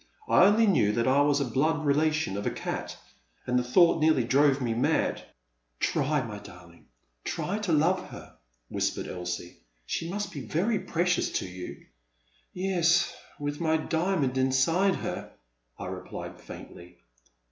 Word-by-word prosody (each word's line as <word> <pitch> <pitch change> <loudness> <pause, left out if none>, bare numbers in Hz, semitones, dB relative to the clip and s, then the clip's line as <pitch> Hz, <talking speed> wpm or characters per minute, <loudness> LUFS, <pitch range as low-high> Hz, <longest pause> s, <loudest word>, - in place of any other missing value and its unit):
I - - +6
only 215 +3 +5
knew 135 - +3
that 115 +2 0
I 135 +2 +4
was 145 0 +3
a 140 - 0
blood 150 +6 0
relation 150 -4 +1
of 100 - -3
a - - +3
cat, - - -5 0.5
and 125 0 +2
the - - -1
thought 165 +6 +4
nearly 155 -5 +4
drove 140 +3 +3
me 120 -3 -1
mad. 115 - 0 0.6
Try, 145 0 +1
my 105 -4 -7
darling, 90 -3 -15 0.4
try 200 +4 -2
to 205 -5 -2
love 180 +4 +2
her, - - -11 0.3
whispered - - -2
Elsie, 90 -1 -5 0.3
she 165 - -3
must 205 +3 -3
be 145 - -6
very 185 - 0
precious 175 +1 0
to - - -1
you 90 0 -9 0.3
— - - -38
Yes, 175 -2 +2 0.2
with 145 +2 -4
my 160 -1 +2
diamond 160 -5 0
inside 165 +9 +3
her, - - -5 0.4
I - - -6
replied - - -7
faintly. 90 0 -11
145 Hz, 155 wpm, -28 LUFS, 120-170 Hz, 0.6 s, I